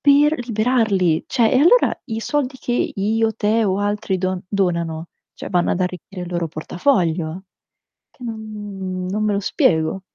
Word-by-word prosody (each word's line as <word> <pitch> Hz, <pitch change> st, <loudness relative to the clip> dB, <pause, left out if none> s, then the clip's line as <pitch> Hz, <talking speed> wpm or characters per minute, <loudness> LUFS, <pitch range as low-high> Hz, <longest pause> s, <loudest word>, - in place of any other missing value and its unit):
per 295 Hz, +2 st, +5 dB
liberarli. 215 Hz, -7 st, +2 dB
Cioè, 235 Hz, -4 st, +2 dB
e 255 Hz, -, +5 dB
allora 350 Hz, -, +4 dB
i 225 Hz, -2 st, -3 dB
soldi 275 Hz, 0 st, -1 dB
che 245 Hz, -, -2 dB, 0.2 s
io, 220 Hz, +3 st, +1 dB
te 220 Hz, +1 st, +1 dB
o 190 Hz, 0 st, +1 dB
altri 205 Hz, -2 st, -1 dB
don 185 Hz, 0 st, -1 dB
donano, 170 Hz, -4 st, -1 dB, 0.3 s
cioè -, -, -7 dB
vanno 175 Hz, -1 st, +2 dB
ad 185 Hz, -, -2 dB
arricchire 180 Hz, +1 st, -4 dB
il 175 Hz, -, -6 dB
loro 175 Hz, -1 st, -1 dB
portafoglio. 170 Hz, -, 0 dB, 0.7 s
Che 250 Hz, -, -15 dB
n 205 Hz, -5 st, -5 dB
non 210 Hz, +3 st, -1 dB
me 210 Hz, -, +1 dB
lo 200 Hz, -, +1 dB
spiego. 190 Hz, -, +1 dB
200 Hz, 160 wpm, -21 LUFS, 180-225 Hz, 0.7 s, per